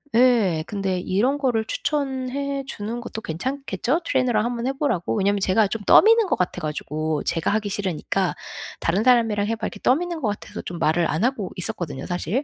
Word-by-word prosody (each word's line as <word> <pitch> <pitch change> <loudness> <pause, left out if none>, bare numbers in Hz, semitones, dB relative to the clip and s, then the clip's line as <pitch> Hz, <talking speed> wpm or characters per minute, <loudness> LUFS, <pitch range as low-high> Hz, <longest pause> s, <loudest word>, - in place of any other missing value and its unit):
예. 230 -10 +4
근데 195 -3 -1
이런 230 +11 +1
거를 240 -6 +1
추천해 275 0 -2
주는 230 0 -5
것도 220 -2 -6
괜찮겠죠? 260 - -2
트레이너랑 240 -4 +2
한번 240 0 -2
해 270 - 0
보라고. 235 - -1
왜냐면 200 0 +2
제가 195 +2 +3
좀 210 +2 -4
떠미는 450 -1 +6
것 - - +2
같아 180 0 -2
가지고 155 0 -2
제가 165 0 0
하기 210 0 0
싫으니까 190 -1 -1 0.4
"다른 190 +6 +1
사람이랑 225 -5 +3
해 225 - 0
봐." 220 - -3
이렇게 - - -9
떠미는 335 +4 +1
것 225 - 0
같아서 205 - -6
좀 175 - -6
말을 165 +2 +2
안 160 +6 0
하고 230 -7 0
있었거든요, 175 -8 -4
사실. 185 - -1
215 Hz, 400 characters per minute, -23 LUFS, 185-255 Hz, 0.4 s, 떠미는